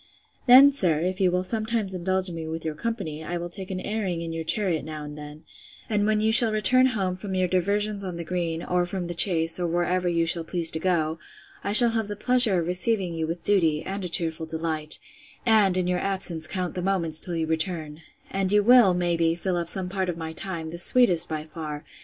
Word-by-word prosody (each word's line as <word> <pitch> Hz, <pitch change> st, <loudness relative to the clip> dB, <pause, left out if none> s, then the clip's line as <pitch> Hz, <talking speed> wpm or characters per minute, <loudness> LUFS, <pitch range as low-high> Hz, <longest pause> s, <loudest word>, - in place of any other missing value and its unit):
Then, 265 Hz, +3 st, +7 dB
sir, 180 Hz, -, +1 dB
if 185 Hz, +2 st, -3 dB
you 185 Hz, -, +3 dB
will 180 Hz, +1 st, -2 dB
sometimes 215 Hz, 0 st, -2 dB
indulge 185 Hz, +1 st, -2 dB
me 165 Hz, -1 st, -7 dB
with 160 Hz, 0 st, -7 dB
your 160 Hz, -, -3 dB
company, 160 Hz, -4 st, -6 dB
I 175 Hz, +2 st, -5 dB
will 175 Hz, 0 st, -6 dB
take 190 Hz, +1 st, -4 dB
an 185 Hz, -1 st, -5 dB
airing 190 Hz, -4 st, -4 dB
in 165 Hz, -1 st, -6 dB
your 165 Hz, 0 st, -5 dB
chariot 165 Hz, 0 st, 0 dB
now 155 Hz, 0 st, -8 dB
and 150 Hz, 0 st, -9 dB
then: 150 Hz, +1 st, -12 dB, 0.5 s
and 205 Hz, -1 st, 0 dB
when 215 Hz, 0 st, 0 dB
you 220 Hz, +1 st, +1 dB
shall 225 Hz, 0 st, +8 dB
return 255 Hz, +5 st, +3 dB
home 185 Hz, -2 st, -2 dB
from 190 Hz, 0 st, -7 dB
your 185 Hz, -1 st, 0 dB
diversions 200 Hz, +3 st, -2 dB
on 185 Hz, -2 st, -6 dB
the 170 Hz, -, -6 dB
green, 170 Hz, -1 st, -4 dB
or 180 Hz, 0 st, -1 dB
from 180 Hz, 0 st, -4 dB
the 175 Hz, -, -6 dB
chase, 165 Hz, -1 st, +3 dB
or 175 Hz, -, -2 dB
where 175 Hz, +2 st, -2 dB
you 170 Hz, -1 st, 0 dB
shall 165 Hz, 0 st, +1 dB
please 165 Hz, 0 st, +2 dB
to 160 Hz, -, -3 dB
go, 160 Hz, -2 st, -2 dB, 0.4 s
I 200 Hz, -, -3 dB
shall 235 Hz, +2 st, +7 dB
have 225 Hz, -2 st, -3 dB
the 205 Hz, -, -6 dB
pleasure 240 Hz, -3 st, +3 dB
of 165 Hz, -, -3 dB
receiving 180 Hz, +1 st, +1 dB
you 160 Hz, -1 st, -4 dB
with 170 Hz, +2 st, -6 dB
duty, 165 Hz, -7 st, +3 dB
and 195 Hz, +1 st, -6 dB
a 180 Hz, -, -4 dB
cheerful 165 Hz, -1 st, 0 dB
delight; 160 Hz, -1 st, -1 dB, 0.5 s
and, 210 Hz, -5 st, +3 dB
in 180 Hz, -, -1 dB
your 180 Hz, 0 st, -1 dB
absence, 185 Hz, -5 st, -1 dB
count 180 Hz, -1 st, -4 dB
the 180 Hz, -, -5 dB
moments 170 Hz, -4 st, +1 dB
till 175 Hz, -, -1 dB
you 165 Hz, -1 st, -2 dB
return; 160 Hz, -1 st, -3 dB, 0.3 s
and 195 Hz, -1 st, -2 dB
you 210 Hz, 0 st, +3 dB
will, 235 Hz, -5 st, +5 dB
may 175 Hz, -1 st, -1 dB
be, 165 Hz, 0 st, 0 dB
fill 180 Hz, +1 st, -3 dB
up 170 Hz, -1 st, -3 dB
some 190 Hz, 0 st, +1 dB
part 190 Hz, 0 st, -4 dB
of 170 Hz, -, -5 dB
my 160 Hz, -1 st, -7 dB
time, 165 Hz, -3 st, -6 dB
the 170 Hz, -, -3 dB
sweetest 180 Hz, -5 st, +5 dB
by 155 Hz, -1 st, -5 dB
far! 155 Hz, -2 st, -9 dB
180 Hz, 230 wpm, -24 LUFS, 165-195 Hz, 0.5 s, shall